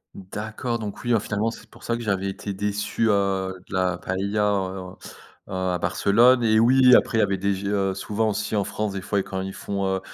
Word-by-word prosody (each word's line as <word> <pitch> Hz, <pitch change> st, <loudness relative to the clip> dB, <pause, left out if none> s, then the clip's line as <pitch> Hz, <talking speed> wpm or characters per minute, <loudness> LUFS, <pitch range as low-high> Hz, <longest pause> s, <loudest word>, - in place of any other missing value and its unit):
D'accord 110 Hz, +5 st, -4 dB
donc 105 Hz, -2 st, -6 dB
oui, 120 Hz, -, -3 dB
alors 115 Hz, -4 st, +3 dB
finalement, 110 Hz, +2 st, -1 dB
c'est -, -, -13 dB
pour -, -, -17 dB
ça 115 Hz, 0 st, -1 dB
que -, -, -7 dB
j'avais 100 Hz, -2 st, -1 dB
été 100 Hz, +1 st, -5 dB
déçu, 105 Hz, +3 st, -1 dB
heu, 95 Hz, -2 st, +1 dB
de -, -, -11 dB
la 90 Hz, -1 st, +1 dB
paëlla 100 Hz, +3 st, -1 dB
en 95 Hz, -1 st, -3 dB
heu, -, -, -16 dB
à 95 Hz, -1 st, -1 dB
Barcelone, 120 Hz, +9 st, +4 dB
et 110 Hz, -1 st, +3 dB
oui 125 Hz, +2 st, +6 dB
après 115 Hz, -, +3 dB
il -, -, +3 dB
y -, -, +5 dB
avait 100 Hz, -1 st, 0 dB
des 100 Hz, +1 st, 0 dB
gé 100 Hz, +1 st, -4 dB
heu, 100 Hz, -2 st, 0 dB
souvent 105 Hz, +3 st, -1 dB
aussi 105 Hz, +1 st, -2 dB
en 100 Hz, -, +2 dB
France, 105 Hz, 0 st, -3 dB
des 95 Hz, -, -4 dB
fois, 100 Hz, 0 st, 0 dB
quand 95 Hz, 0 st, -4 dB
ils 95 Hz, 0 st, -5 dB
font, 100 Hz, -1 st, -3 dB
heu -, -, -4 dB
100 Hz, 230 wpm, -24 LUFS, 95-110 Hz, -, oui